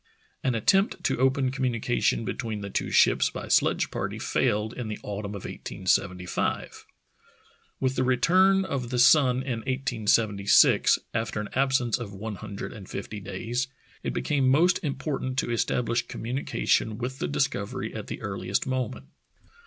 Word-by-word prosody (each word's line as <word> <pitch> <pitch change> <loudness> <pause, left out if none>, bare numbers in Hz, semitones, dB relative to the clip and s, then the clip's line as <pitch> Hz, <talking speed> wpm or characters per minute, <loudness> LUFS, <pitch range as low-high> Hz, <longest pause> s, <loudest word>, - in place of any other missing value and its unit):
An 130 -3 +1
at 110 - -4
tempt 195 +1 +3
to - - 0
open 130 0 +2
communication 120 -3 0
between 110 -3 -4
the 100 0 -6
two - - -1
ships - - +4
by - - -7
sledge - - +2
party - - -3
failed 105 +2 0
in 120 -3 -5
the 105 - -4
autumn 105 0 -5
of 100 - -7
1875. 90 -1 -2 0.9
With 130 0 0
the 130 - +1
return 185 +10 +4
of 130 -8 -3
the 125 - -2
sun 130 0 +5
in 125 -4 -3
1876, 110 -5 +3 0.2
after 110 -1 -2
an 105 - -4
absence 130 -3 +1
of 105 -4 -7
one 105 +1 -5
hundred 100 -1 -7
and 105 -5 -11
fifty 105 +2 -6
days, 120 +5 -3 0.3
it - - -2
became 140 -3 +1
most 170 +7 +3
important 135 -2 -3
to 120 - 0
establish 120 +1 0
communication 115 -3 -1
with 130 +2 -4
the - - -1
Discovery 70 0 -2
at - - -6
the - - -6
earliest 95 -1 -2
moment. 130 -1 -3
120 Hz, 155 wpm, -27 LUFS, 105-130 Hz, 0.9 s, sun